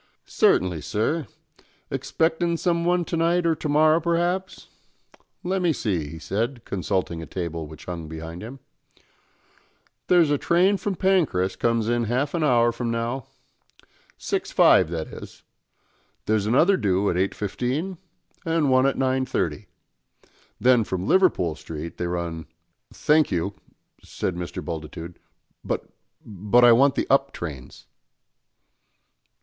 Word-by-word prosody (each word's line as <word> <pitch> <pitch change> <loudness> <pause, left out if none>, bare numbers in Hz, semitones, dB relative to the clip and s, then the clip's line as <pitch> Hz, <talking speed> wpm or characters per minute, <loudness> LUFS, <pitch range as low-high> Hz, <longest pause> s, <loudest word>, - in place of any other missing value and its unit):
"Certainly, 90 -4 +2
sir; 115 - -1 0.6
expectin' 170 +1 0
some 170 -1 0
one 175 0 +2
to 170 - -3
night 170 +1 +1
or 165 - +3
to 155 -1 -5
morrow 155 +2 +4
p'raps. 175 +3 -1 0.8
Let 185 +1 -1
me 175 -2 +2
see," 90 - -2
he 80 - -8
said, 115 - -3
consulting 90 -3 -2
a 80 - -8
table 85 -3 -4
which 80 +1 -12
hung 85 -3 -6
behind 80 +2 -8
him. 125 +5 -9 1.5
"There's 170 -4 +4
a 145 - +1
train 185 +4 +3
from 200 0 -3
Pancras 160 - +1
comes 115 -2 0
in 120 +1 +1
in 120 - 0
half 130 +6 -1
an 170 -2 0
hour 120 -4 +4
from 115 0 -4
now, 115 +2 -3 0.9
6.5 - - +3
that 80 -1 -4
is; - - -11 0.8
there's 105 -1 +1
another 160 - +4
doo 100 - +1
at - - -3
8.15, 125 - -2 0.4
and 165 -4 +1
one 130 +1 +4
at 135 - 0
9.30. 130 -5 -1 0.9
Then 125 -2 +4
from 95 -2 -4
Liverpool 165 - +3
Street 80 +1 -8
they 90 - -2
run 85 -2 -4 0.2
" - - -52
"Thank 155 0 +2
you," 90 +3 -1 0.5
said 90 - -4
Mr. 90 -2 -6
Bultitude, 80 +1 -7 0.4
"but - - -3 0.4
but 105 +4 +3
I 120 - +8
want 135 +4 +5
the - - 0
up 135 0 +3
trains." 70 -7 -8
120 Hz, 135 wpm, -24 LUFS, -, 1.5 s, I